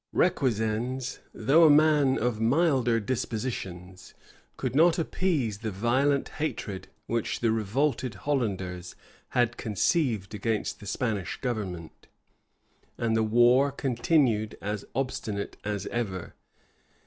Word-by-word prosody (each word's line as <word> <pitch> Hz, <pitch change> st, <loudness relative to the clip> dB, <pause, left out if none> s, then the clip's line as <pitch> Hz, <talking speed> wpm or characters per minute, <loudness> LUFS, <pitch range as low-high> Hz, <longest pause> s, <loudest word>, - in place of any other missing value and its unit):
Requesens, 125 Hz, -, 0 dB
though 140 Hz, +9 st, +4 dB
a 160 Hz, -, +8 dB
man 150 Hz, -3 st, +5 dB
of 115 Hz, -2 st, -1 dB
milder 125 Hz, -2 st, +3 dB
dispositions, 105 Hz, -6 st, -4 dB, 0.4 s
could -, -, -3 dB
not 165 Hz, +3 st, +5 dB
appease 155 Hz, -, -1 dB
the 110 Hz, 0 st, -3 dB
violent 130 Hz, +8 st, +1 dB
hatred 105 Hz, -10 st, -3 dB, 0.2 s
which 115 Hz, -1 st, -2 dB
the 115 Hz, -2 st, +2 dB
revolted 120 Hz, +3 st, 0 dB
Hollanders 95 Hz, -8 st, -2 dB, 0.4 s
had 120 Hz, -1 st, +2 dB
conceived 110 Hz, -, 0 dB
against 105 Hz, +1 st, -2 dB
the 105 Hz, -, -10 dB
Spanish 105 Hz, -4 st, -2 dB
government; 95 Hz, -, -5 dB, 0.9 s
and 115 Hz, -1 st, 0 dB
the 110 Hz, -, +3 dB
war 120 Hz, +5 st, +4 dB
continued 125 Hz, -4 st, +1 dB
as 105 Hz, 0 st, -4 dB
obstinate 110 Hz, -6 st, -3 dB
as 105 Hz, -1 st, -3 dB
ever. 95 Hz, -7 st, -3 dB
115 Hz, 110 wpm, -27 LUFS, 105-135 Hz, 0.9 s, a